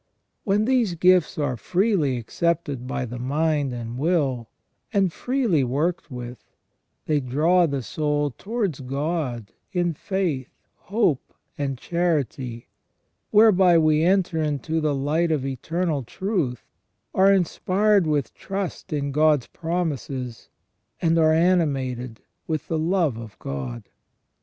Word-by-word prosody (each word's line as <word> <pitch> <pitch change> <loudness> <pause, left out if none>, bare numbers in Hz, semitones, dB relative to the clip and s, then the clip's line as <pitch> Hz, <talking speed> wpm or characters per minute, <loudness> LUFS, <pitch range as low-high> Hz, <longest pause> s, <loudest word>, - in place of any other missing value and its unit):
When 205 +1 +2
these 240 -8 +2
gifts 180 0 +3
are 145 -4 0
freely 175 - +1
accepted 145 +1 -2
by 135 -1 -2
the 120 0 -7
mind 145 +2 0
and 120 0 -5
will, 140 -8 0 0.4
and 195 -6 +2
freely 245 - +1
worked 155 +7 -1
with, 125 -2 -8 0.6
they 150 -1 +2
draw 160 +7 +3
the 140 -3 -2
soul 145 +3 -1
towards 200 - -3
God 135 -4 -3 0.2
in 175 -3 0
faith, 155 -6 -2 0.3
hope, 195 - -1 0.2
and 135 -2 -2
charity, 140 -8 -2 0.6
whereby 195 -5 +6
we 155 -1 +3
enter 180 -2 +2
into 155 +2 -1
the 150 -2 +1
light 155 +5 +1
of 145 -4 0
eternal 155 +4 -2
truth, 165 - -2 0.5
are 195 +1 +5
inspired 195 +1 +2
with 145 -6 0
trust 195 -3 -5
in 140 -2 -1
God's 150 -2 +3
promises, 145 -8 -4 0.5
and 165 -1 +2
are 155 -1 +5
animated 135 -9 +1 0.3
with 155 -1 -3
the 160 - 0
love 165 -6 +1
of 115 -3 -9
God. 65 -3 -5
155 Hz, 125 wpm, -24 LUFS, 130-180 Hz, 0.6 s, whereby